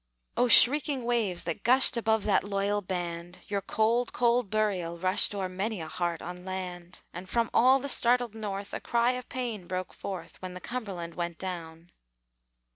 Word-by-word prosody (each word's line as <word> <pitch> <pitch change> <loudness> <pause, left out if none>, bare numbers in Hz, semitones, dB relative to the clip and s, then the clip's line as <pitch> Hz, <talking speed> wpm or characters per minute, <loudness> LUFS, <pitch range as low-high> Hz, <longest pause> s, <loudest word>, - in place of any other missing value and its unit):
O 250 - +2
shrieking 265 +1 +6
waves 225 -7 0
that 170 -2 -4
gushed 255 +2 +5
Above 220 -2 +1
that 210 - +2
loyal 200 +1 -1
band, 175 -2 -5
Your 200 -1 -2
cold, 225 +5 0
cold 240 -2 +1
burial 195 -5 -1
rushed 185 +3 +3
O'er 195 -2 -2
many 195 +3 -4
a 160 - -6
heart 170 0 -3
on 180 +1 -8
land! 180 -1 -7
And 180 +2 -9
from 230 +1 0
all 260 +3 +5
the 275 +1 -5
startled 245 -3 +2
North 205 -2 -6
A - - -3
cry 235 +1 +1
of 250 0 -7
pain 235 -8 -5
broke 185 0 -4
forth, 175 -4 -8
When 185 -1 -7
the - - -7
Cumberland 190 -7 -6
went 170 -1 -4
down. 170 -2 -7
200 Hz, 175 wpm, -28 LUFS, 180-235 Hz, -, shrieking